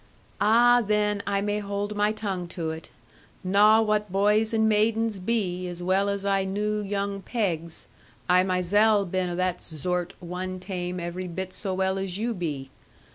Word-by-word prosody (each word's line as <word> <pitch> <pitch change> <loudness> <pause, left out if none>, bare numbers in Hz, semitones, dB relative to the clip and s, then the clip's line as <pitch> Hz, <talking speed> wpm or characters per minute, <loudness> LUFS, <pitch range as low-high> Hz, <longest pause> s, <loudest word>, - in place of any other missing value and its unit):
'Ah, 240 +3 +5
then 210 -1 +1
I 200 -1 +1
may 205 +1 -1
hold 205 +1 -3
my 210 +1 +2
tongue 195 -5 -4
to 165 -2 -4
it. 160 0 -8 0.5
Knaw 210 +4 +5
what 210 -2 0
boys 210 +3 +3
and 220 -1 +2
maidens 220 0 +1
be, 185 -3 -1
as 175 0 -6
well 190 +2 +2
as 200 0 -3
I 195 -1 +2
knew 210 +2 -1
young 200 -1 -2
pegs. 170 -7 -2 0.4
I 180 0 +5
myzell 200 +3 +3
been 185 0 -1
o' 175 - -3
that 185 0 -1
zort 175 +3 -3
one 185 +1 -5
taime 180 -1 -4
every 175 +2 -4
bit 185 +2 -5
so 190 -3 -2
well 190 0 0
as 190 -1 -3
you 230 +3 -1
be.' 145 -8 -4
195 Hz, 170 wpm, -26 LUFS, 180-210 Hz, 0.5 s, Ah